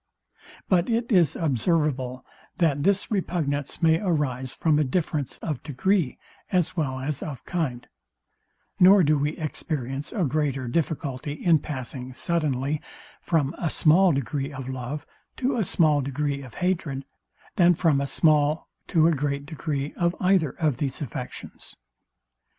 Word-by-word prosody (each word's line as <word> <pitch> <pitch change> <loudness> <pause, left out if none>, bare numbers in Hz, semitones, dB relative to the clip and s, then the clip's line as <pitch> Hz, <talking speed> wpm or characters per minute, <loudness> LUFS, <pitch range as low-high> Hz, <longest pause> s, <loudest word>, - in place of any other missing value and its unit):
But 180 0 +2
it 235 +1 0
is 170 -7 +4
observable, 135 -3 0 0.3
that 150 -5 +2
this 200 +6 +1
repugnance 160 -7 -2
may 160 0 +5
arise 145 -9 -1
from 155 -2 +2
a - - +4
difference 150 -2 -1
of 150 -6 -3
degree 155 +2 0 0.3
as 185 -1 +1
well 135 -6 -1
as 140 +1 -2
of 140 -6 -6
kind; 140 -9 -2 0.9
nor 190 +1 +7
do 155 0 +4
we 150 +2 -1
experience 145 -3 -3
a 200 - -1
greater 140 -3 0
difficulty 145 -1 -2
in 160 +1 +3
passing 130 -2 -6
suddenly 150 -3 -1 0.4
from 160 -4 +1
a 170 - 0
small 175 +5 +4
degree 140 +1 -2
of 135 -2 -7
love 130 +3 -5 0.3
to 260 +1 0
a 230 - +1
small 155 -5 +3
degree 140 +1 -2
of 130 -4 -11
hatred, 165 -7 -1 0.5
than 175 -1 +6
from 155 -5 +2
a 140 - -1
small 150 0 +2 0.2
to 160 -3 +3
a - - +4
great 140 -1 -1
degree 145 -2 -3
of 175 0 0
either 180 -6 +2
of 155 -7 +1
these 135 -2 -2
affections. 130 - -8
150 Hz, 145 wpm, -25 LUFS, 135-170 Hz, 0.9 s, nor